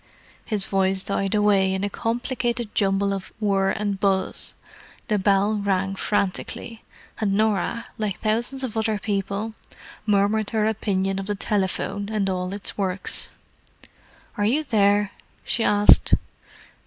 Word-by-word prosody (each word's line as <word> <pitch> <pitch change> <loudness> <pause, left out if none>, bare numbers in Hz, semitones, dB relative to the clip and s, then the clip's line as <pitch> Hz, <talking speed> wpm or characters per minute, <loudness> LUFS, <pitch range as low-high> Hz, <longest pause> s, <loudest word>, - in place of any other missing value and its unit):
His 210 -4 +1
voice 190 0 +1
died 195 0 -1
away 200 -2 +3
in 190 - -2
a 205 - 0
complicated 240 0 -2
jumble 200 0 +2
of 195 -1 -5
whir 195 -2 +2
and 205 -2 -1
buzz, 195 -1 0 0.5
the 210 -2 +2
bell 200 +2 +3
rang 195 -1 0
frantically, 205 +3 -2 0.4
and 210 -3 +1
Norah, 215 +1 +1
like 210 -3 -2
thousands 240 +5 -1
of 235 -4 -4
other 220 -1 +1
people, 205 +1 -2 0.5
murmured 205 +1 +2
her 220 -2 +1
opinion 195 -3 0
of 195 - -5
the 205 - -1
telephone 200 0 -1
and 210 -3 0
all 180 0 -2
its 200 0 -4
works. 190 -1 -2 1.1
"Are 205 - +1
you 275 +9 +2
there?" 205 -5 +3 0.3
she 230 - 0
asked. 205 -1 +6
205 Hz, 135 wpm, -24 LUFS, 195-220 Hz, 1.1 s, asked